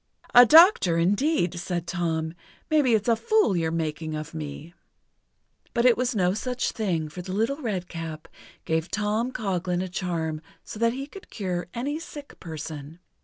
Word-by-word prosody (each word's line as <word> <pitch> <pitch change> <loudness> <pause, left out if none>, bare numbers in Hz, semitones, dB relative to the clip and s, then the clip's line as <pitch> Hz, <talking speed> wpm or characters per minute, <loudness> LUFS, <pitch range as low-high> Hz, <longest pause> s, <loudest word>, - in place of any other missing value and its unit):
"A 245 0 +9
doctor, 320 - +7
indeed!" 185 - +1
said 175 -1 -3
Tom. 165 -2 -2 0.4
"Maybe 285 -7 +4
it's 215 +1 -1
a 230 - +5
fool 430 - +2
you're 165 -2 0
making 160 -1 -3
of 155 +1 -6
me!" 155 +1 -7 1.0
But 235 - +2
it 245 -2 +7
was 250 -1 -1
no 180 -2 +2
such 250 +4 -2
thing, 175 -8 -1
for 165 +4 -8
the 185 +1 -6
Little 225 +7 0
Redcap 170 - -4 0.4
gave 160 +1 -1
Tom 215 +4 -1
Coghlan 185 -5 -1
a - - -4
charm 165 -4 -3 0.2
so 210 - -9
that 230 0 +3
he 270 +2 -4
could 380 +7 -13
cure 180 -4 -3
any 285 +6 -2
sick 295 -3 -10
person. 155 -2 -7
185 Hz, 165 wpm, -26 LUFS, 165-235 Hz, 1.0 s, A